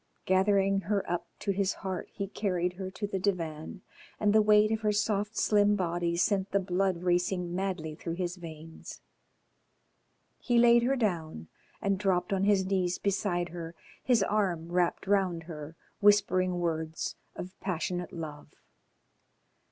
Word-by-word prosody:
Gathering 195 Hz, +1 st, +3 dB
her 200 Hz, +1 st, -1 dB
up 175 Hz, 0 st, -2 dB
to 200 Hz, -, -1 dB
his 195 Hz, 0 st, 0 dB
heart 190 Hz, -2 st, -5 dB
he 200 Hz, -, -4 dB
carried 180 Hz, -3 st, -1 dB
her 185 Hz, 0 st, -5 dB
to 200 Hz, +3 st, -4 dB
the 195 Hz, -1 st, -3 dB
divan, 170 Hz, -2 st, -3 dB, 0.4 s
and 210 Hz, -1 st, +3 dB
the 215 Hz, -, +6 dB
weight 210 Hz, 0 st, +5 dB
of 220 Hz, -, +1 dB
her 210 Hz, -1 st, +2 dB
soft 210 Hz, 0 st, 0 dB
slim 205 Hz, -1 st, +4 dB
body 175 Hz, -2 st, -1 dB
sent 195 Hz, +1 st, +1 dB
the 200 Hz, -, +2 dB
blood 185 Hz, -1 st, 0 dB
racing 180 Hz, 0 st, 0 dB
madly 180 Hz, -4 st, -2 dB
through 165 Hz, +2 st, -5 dB
his 175 Hz, 0 st, -3 dB
veins. 160 Hz, -1 st, -10 dB, 1.4 s
He 240 Hz, -1 st, +1 dB
laid 235 Hz, 0 st, +6 dB
her 260 Hz, +3 st, +2 dB
down, 165 Hz, -, -2 dB, 0.3 s
and 195 Hz, -1 st, +1 dB
dropped 185 Hz, -1 st, +1 dB
on 195 Hz, 0 st, +1 dB
his 200 Hz, -2 st, +3 dB
knees 185 Hz, -2 st, 0 dB
beside 185 Hz, -3 st, -1 dB
her, 165 Hz, 0 st, -7 dB, 0.3 s
his 240 Hz, -5 st, +3 dB
arm 180 Hz, -6 st, 0 dB
wrapped 175 Hz, -1 st, +1 dB
round 190 Hz, -4 st, +1 dB
her, 160 Hz, -1 st, -8 dB, 0.2 s
whispering 185 Hz, -3 st, +3 dB
words 160 Hz, -2 st, -2 dB, 0.2 s
of 185 Hz, +1 st, -7 dB
passionate 180 Hz, -1 st, -3 dB
love. 155 Hz, -4 st, -8 dB
185 Hz, 150 wpm, -29 LUFS, 175-205 Hz, 1.4 s, the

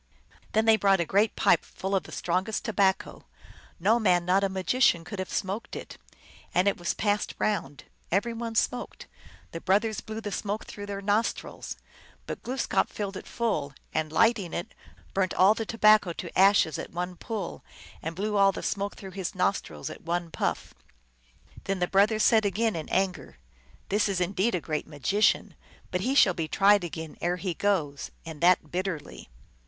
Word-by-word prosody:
Then 220 Hz, +1 st, +3 dB
they 225 Hz, -1 st, +6 dB
brought 195 Hz, -2 st, +3 dB
a 170 Hz, -, +1 dB
great 200 Hz, +6 st, +2 dB
pipe -, -, +3 dB
full 190 Hz, +1 st, -5 dB
of 190 Hz, -, 0 dB
the -, -, -11 dB
strongest 185 Hz, +5 st, -1 dB
tobacco; 195 Hz, -4 st, 0 dB, 0.5 s
no 215 Hz, +7 st, +3 dB
man 180 Hz, -5 st, +3 dB
not 190 Hz, +2 st, +3 dB
a 195 Hz, -, +2 dB
magician 190 Hz, -1 st, +2 dB
could 185 Hz, +4 st, -7 dB
have 185 Hz, -, -4 dB
smoked 195 Hz, +4 st, -3 dB
it. -, -, -8 dB, 0.6 s
And 180 Hz, +2 st, +3 dB
it 200 Hz, -, +3 dB
was 175 Hz, -1 st, -2 dB
passed 205 Hz, 0 st, 0 dB
round: 155 Hz, -10 st, -2 dB, 0.3 s
every 205 Hz, +6 st, +1 dB
one 230 Hz, 0 st, -5 dB
smoked; 245 Hz, +3 st, -1 dB, 0.5 s
the 165 Hz, -, -6 dB
brothers 210 Hz, +3 st, +1 dB
blew 220 Hz, 0 st, -6 dB
the 210 Hz, -2 st, -5 dB
smoke 205 Hz, +2 st, -3 dB
through 205 Hz, -1 st, -8 dB
their 200 Hz, 0 st, -5 dB
nostrils. 210 Hz, +3 st, -1 dB, 0.5 s
But -, -, -6 dB
Glooskap 255 Hz, +1 st, 0 dB
filled 200 Hz, -2 st, -4 dB
it -, -, -8 dB
full, 155 Hz, -, -2 dB, 0.2 s
and, 155 Hz, -1 st, -1 dB
lighting 205 Hz, 0 st, +2 dB
it, 175 Hz, -, -5 dB, 0.4 s
burnt 190 Hz, -2 st, 0 dB
all 190 Hz, +3 st, +6 dB
the 220 Hz, 0 st, -4 dB
tobacco 215 Hz, -5 st, +4 dB
to 170 Hz, 0 st, -8 dB
ashes 195 Hz, -6 st, +4 dB
at -, -, -6 dB
one 180 Hz, +1 st, -4 dB
pull, 210 Hz, 0 st, -5 dB, 0.4 s
and 165 Hz, +1 st, -5 dB
blew 210 Hz, +3 st, -1 dB
all 195 Hz, 0 st, +6 dB
the -, -, -7 dB
smoke 200 Hz, 0 st, -2 dB
through 190 Hz, -1 st, -9 dB
his 190 Hz, -1 st, -5 dB
nostrils 130 Hz, -, -1 dB
at -, -, -10 dB
one 170 Hz, 0 st, -2 dB
puff. -, -, -2 dB, 0.9 s
Then 195 Hz, -, -1 dB
the 180 Hz, -, +1 dB
brothers 210 Hz, +3 st, +3 dB
said 220 Hz, -2 st, +5 dB
again 210 Hz, +2 st, 0 dB
in 160 Hz, -2 st, -5 dB
anger, 190 Hz, -1 st, -1 dB, 0.3 s
" -, -, -29 dB
This 205 Hz, +1 st, +2 dB
is 190 Hz, -2 st, 0 dB
indeed 190 Hz, +5 st, +1 dB
a 175 Hz, -, -2 dB
great 155 Hz, -1 st, -3 dB
magician. 165 Hz, +8 st, +1 dB, 0.4 s
Yet 180 Hz, -, 0 dB
he 260 Hz, +7 st, 0 dB
shall 195 Hz, -9 st, +6 dB
be 165 Hz, -2 st, -3 dB
tried 200 Hz, +3 st, +4 dB
again 160 Hz, -2 st, -6 dB
ere 175 Hz, +1 st, 0 dB
he 180 Hz, 0 st, -2 dB
goes, 165 Hz, -7 st, -1 dB, 0.2 s
and 160 Hz, -2 st, -8 dB
that 175 Hz, -3 st, +4 dB
bit 185 Hz, +2 st, -1 dB
terly." 160 Hz, -6 st, -6 dB
195 Hz, 185 wpm, -27 LUFS, 175-210 Hz, 0.9 s, they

